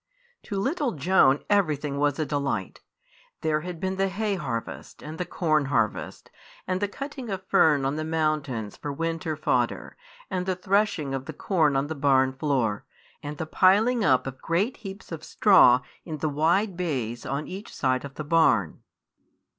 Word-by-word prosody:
To 200 - -4
little 275 - -1
Joan 145 -3 +3
everything 150 -8 +1
was 145 -1 +2
delightful. 140 - -2 0.6
There 155 -1 0
had 175 0 -6
been 190 +1 -2
the 195 0 +2
hay 205 +2 -1
harvest, 130 -11 -5
and 155 +1 -8
the 180 - -2
corn 155 -4 +1
harvest, 115 -6 -2 0.3
and 185 0 -1
the 205 - +1
cutting 275 +2 -7
of 190 -1 -4
fern 150 -6 +4
on 140 +3 -1
the 155 - -2
mountains 155 -9 -1
for 145 - -5
winter 165 +2 -2
fodder, - - -1 0.3
and 180 0 -3
the 185 - +1
threshing 190 -6 0
of 135 0 -3
the - - -6
corn 160 -7 +1
on 135 +1 +1
the 155 - -4
barn 135 -3 +3
floor, 130 -7 -1 0.4
and 145 0 -6
the 160 - -3
piling 210 +8 +3
up 130 -9 +3
of 135 -1 -7
great 195 +9 0
heaps 195 -4 -10
of 165 -1 -6
straw 145 - +5 0.2
in 160 -3 -6
the 155 +1 -1
wide 170 +7 +1
bays 130 -10 -3
on 140 +3 -3
each 195 +4 -8
side 130 -2 0
of 140 -1 -9
the 150 - -5
barn. 145 - +2
155 Hz, 170 wpm, -26 LUFS, 140-190 Hz, 0.6 s, straw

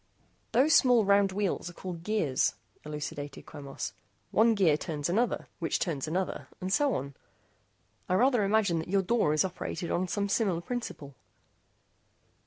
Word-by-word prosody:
"Those 280 +6 +4
small 245 -8 +5
round 200 0 +4
wheels 195 -2 -1
are - - -11
called 175 -1 -7
gears," 175 -9 +1 0.3
elucidated 145 -1 -6
Quemos, 140 -9 -6 0.4
"one 225 +1 +4
gear 180 -7 +4
turns 150 -1 -3
another, 230 +6 0
which 165 -3 0
turns 160 -4 -2
another, 180 +4 -2
and 185 +1 -2
so 285 +1 +3
on. 140 +2 -4 1.0
I 185 - +3
rather 245 +1 +3
imagine 200 -4 +2
that 160 - -5
your 195 0 +2
door 220 -5 +2
is 155 +5 +3
operated 180 -1 -4
on 185 +1 0
some 200 +2 -1
similar 195 -4 +1
principle." 175 - -5
185 Hz, 150 wpm, -29 LUFS, 155-215 Hz, 1.0 s, small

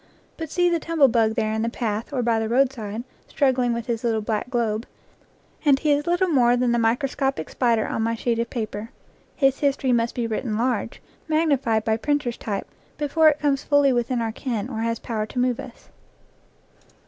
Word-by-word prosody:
But 320 -2 -6
see 355 +3 +2
the 340 -1 +2
tumblebug 255 -10 +2
there 215 -2 0
in 220 - -1
the 230 - 0
path 225 -1 -3
or 260 -3 -1
by 230 -1 +2
the 220 0 -2
roadside, 235 -4 0 0.2
struggling 255 -4 +1
with 235 -1 -3
his 235 -2 -3
little 225 -2 +1
black 220 +3 -2
globe, 230 -3 -1 0.8
and 285 -3 +5
he 300 +2 +1
is 290 +2 +1
little 350 +2 +2
more 245 -5 +4
than 245 -1 +1
the 235 - +2
microscopic 265 - 0
spider 235 -3 +1
on - - -2
my 230 +1 0
sheet 230 0 -1
of 235 0 -1
paper. 220 -2 -4 0.5
His 270 -2 +2
his 280 -1 +2
tory 260 -2 +1
must 235 0 0
be 240 - -1
written 220 0 -2
large, 240 -1 -2 0.2
magnified 280 -9 +1
by 220 0 +1
printer's 290 -2 -1
type, 200 -3 -4 0.3
before 310 +2 +4
it 290 - 0
comes 285 -2 +1
fully 285 -2 +4
within 240 0 0
our 225 - -2
ken 230 -1 -3
or 220 - -4
has 230 0 -1
power 215 -2 -3
to 250 - -11
move 250 0 +1
us. 265 -3 -11
240 Hz, 195 wpm, -23 LUFS, 225-275 Hz, 0.8 s, and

